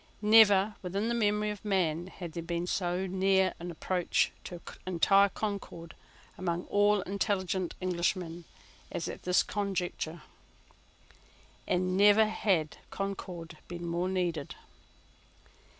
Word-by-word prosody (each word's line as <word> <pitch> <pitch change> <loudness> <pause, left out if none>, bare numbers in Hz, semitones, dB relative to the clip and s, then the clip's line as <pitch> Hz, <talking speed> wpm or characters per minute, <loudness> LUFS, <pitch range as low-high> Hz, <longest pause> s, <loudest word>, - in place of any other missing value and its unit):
Never, 210 -1 +6
within 195 +5 -2
the - - +1
memory 210 -2 +1
of 210 - -8
man, 175 -5 0
had 180 -3 -8
there 170 - -5
been 170 +1 -3
so 180 0 -1
near 190 0 +2
an 175 +1 -6
approach 175 +1 0
to 175 - -7 0.3
entire 195 +3 +4
concord 195 -6 -5 0.5
among 175 -1 -1
all 205 0 +3
intelligent 190 -2 -1
Englishmen 175 -1 -2 0.5
as - - -3
at - - -6
this 180 0 +3
conjuncture: 180 -5 -3 1.4
and 185 0 +1
never 205 +2 +6
had 190 -7 0
concord 180 -5 -5
been 175 0 -6
more 170 +2 -1
needed. 175 -6 -2
185 Hz, 120 wpm, -30 LUFS, 175-200 Hz, 1.4 s, Never